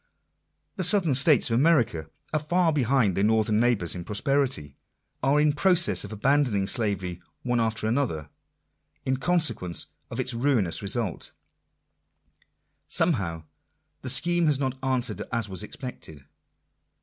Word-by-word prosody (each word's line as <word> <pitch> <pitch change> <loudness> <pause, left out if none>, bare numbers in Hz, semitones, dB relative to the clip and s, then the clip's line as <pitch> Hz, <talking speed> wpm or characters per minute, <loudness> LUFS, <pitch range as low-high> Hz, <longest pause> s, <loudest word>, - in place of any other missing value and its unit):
The 185 - -1
southern 180 -5 +3
states 135 0 +4
of 115 - +2
America 120 - +2 0.2
are 155 - +2
far 165 +2 +1
behind 125 -8 +1
their 100 - 0
northern 110 0 +2
neighbours 115 -8 +1
in 90 - -5
prosperity 110 - 0 0.2
— - - -50
are 140 +3 +3
in 150 0 +3
process 175 +2 +3
of 105 - -9
abandoning 115 -2 +1
slavery 95 -5 -2 0.2
one 125 -1 0
after 115 -1 -1
another, 110 - -2 0.7
in 130 0 0
consequence 155 - -1 0.2
of 115 - -6
its 130 -1 0
ruinous 115 -8 +1
results. 100 -1 -2 1.5
Somehow 100 - +1 0.6
the 130 - -4
scheme 170 +5 +2
has 150 -3 +2
not 130 -2 -2
answered 130 -1 -1
as 115 -3 -1
was 95 -1 -6
expected. 105 - -9
125 Hz, 135 wpm, -26 LUFS, 100-145 Hz, 1.5 s, states